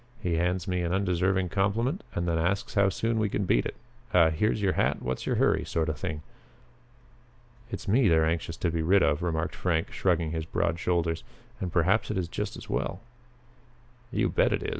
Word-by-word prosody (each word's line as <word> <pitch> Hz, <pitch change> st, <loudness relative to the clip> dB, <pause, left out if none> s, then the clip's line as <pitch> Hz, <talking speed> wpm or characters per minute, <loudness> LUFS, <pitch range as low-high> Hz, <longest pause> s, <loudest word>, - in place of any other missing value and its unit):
"He 90 Hz, -, -1 dB
hands 90 Hz, +1 st, 0 dB
me 90 Hz, -1 st, 0 dB
an 85 Hz, -1 st, -1 dB
undeserved 95 Hz, -1 st, +1 dB
compliment 115 Hz, -, 0 dB
and 85 Hz, 0 st, -1 dB
then 85 Hz, -1 st, +1 dB
asks 95 Hz, +8 st, -1 dB
how 100 Hz, -3 st, +4 dB
soon 115 Hz, +3 st, -1 dB
we 105 Hz, -1 st, +1 dB
can 100 Hz, -, -1 dB
beat -, -, +2 dB
it. -, -, -7 dB, 0.4 s
A 85 Hz, -3 st, +6 dB
'here's 105 Hz, +7 st, +1 dB
your 100 Hz, -2 st, +1 dB
hat, -, -, +1 dB
what's 65 Hz, +1 st, -4 dB
your -, -, +1 dB
hurry' -, -, +2 dB
sort 80 Hz, -1 st, -1 dB
of 75 Hz, -, -3 dB
thing." 75 Hz, +1 st, -4 dB, 1.5 s
"It's 110 Hz, -, -6 dB
me 115 Hz, +3 st, +4 dB
they're 80 Hz, -3 st, +4 dB
anxious 85 Hz, 0 st, -2 dB
to 85 Hz, -, 0 dB
be 85 Hz, 0 st, -1 dB
rid 95 Hz, +4 st, +4 dB
of," 70 Hz, +2 st, +2 dB
remarked 80 Hz, -1 st, -1 dB
Frank, 85 Hz, -3 st, 0 dB
shrugging 85 Hz, -4 st, +1 dB
his 80 Hz, -1 st, -3 dB
broad 85 Hz, +1 st, -1 dB
shoulders, 85 Hz, -2 st, 0 dB, 0.4 s
"and 90 Hz, -, -3 dB
perhaps 95 Hz, +6 st, +2 dB
it 105 Hz, -, -1 dB
is 90 Hz, -2 st, -1 dB
just -, -, -4 dB
as -, -, -10 dB
well." -, -, -2 dB, 1.1 s
"You -, -, +1 dB
bet -, -, +2 dB
it -, -, -1 dB
is!" -, -, -2 dB
90 Hz, 205 wpm, -28 LUFS, 80-100 Hz, 1.5 s, A